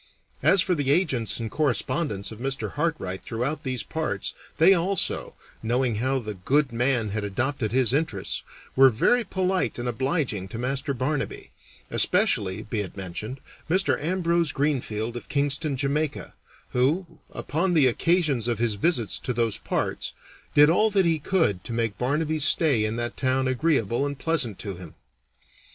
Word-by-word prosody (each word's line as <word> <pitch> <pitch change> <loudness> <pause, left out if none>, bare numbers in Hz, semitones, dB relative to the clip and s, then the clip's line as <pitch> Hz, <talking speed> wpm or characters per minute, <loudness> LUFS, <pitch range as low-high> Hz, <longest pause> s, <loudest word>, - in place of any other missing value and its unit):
As 190 -3 +5
for 185 - +1
the 145 -5 -1
agents 140 - +1
and 115 -2 -4
correspondents 140 - -1
of 110 - -10
Mr. 135 +2 -2
Hartright 150 - -2
throughout 125 +7 -3
these 130 -5 -3
parts, 160 -1 -3 0.2
they 175 +5 +7
also, 190 +2 0 0.3
knowing 120 0 0
how 130 +4 0
the 110 -4 -4
good 135 +9 +1
man 120 -2 +1
had 105 +1 -3
adopted 115 +3 -1
his 125 -1 +2
interests, 135 -10 -1 0.3
were 135 0 +7
very 235 - +2
polite 190 -2 -1
and 120 0 -3
obliging 120 - -1
to 105 - -7
Master 135 +3 -2
Barnaby 135 +3 -3 0.4
especially, 95 -2 +2
be 110 +1 -3
it 100 -1 -5
mentioned, 100 +7 -6 0.3
Mr. 185 -3 +1
Ambrose 170 -2 +1
Greenfield, 120 -6 -1
of 120 - -8
Kingston, 145 0 0
Jamaica, 145 +2 -2 0.4
who, 150 +9 0
upon 175 +4 -1
the 150 -4 +5
occasions 145 -2 +2
of 120 -2 0
his 115 -1 +1
visits 115 - +1
to 125 - -3
those 115 -2 0
parts, - - -2 0.4
did 145 0 +8
all 210 +7 +4
that 195 -3 +2
he 165 -2 +2
could 140 - +1
to 115 - -5
make 115 -3 -2
Barnaby's 150 +4 0
stay 145 -9 +3
in 110 +1 -2
that 120 0 -3
town 130 0 +1
agreeable 130 -2 +1
and 140 -1 -5
pleasant 140 - 0
to 100 -4 -6
him. 90 -3 -11
135 Hz, 160 wpm, -25 LUFS, 115-155 Hz, 0.4 s, did